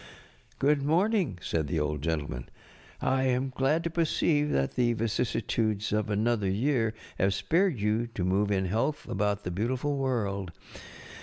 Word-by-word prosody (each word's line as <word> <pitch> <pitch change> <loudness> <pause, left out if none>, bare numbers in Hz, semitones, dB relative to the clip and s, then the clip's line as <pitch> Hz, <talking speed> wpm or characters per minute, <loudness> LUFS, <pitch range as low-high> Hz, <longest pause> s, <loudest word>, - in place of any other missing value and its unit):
"Good 145 +1 +3
morning, 175 - +2
ŌĆØ 90 - -17
said 80 -2 -1
the 80 0 -1
Old 75 -1 -1
Gentleman. 75 -6 -3 0.5
ŌĆ£I 130 0 +2
am 130 +1 0
glad 150 +6 +2
to 170 - -2
perceive 155 -2 +1
that 70 - 0
the 120 -1 +2
vicissitudes 110 -2 -1
of 105 0 0
another 105 -1 +1
year 115 +1 +1 0.2
have 95 0 +2
spared 170 - +1
you 105 +3 +1
to 90 - -1
move 95 +3 +2
in 95 -1 +1
health 115 +11 -1
about 105 0 -1
the 90 - -3
beauti┬¼ 115 +8 -1
ful 145 +2 -1
world. 100 -9 -1
115 Hz, 160 wpm, -29 LUFS, 100-135 Hz, 0.5 s, Good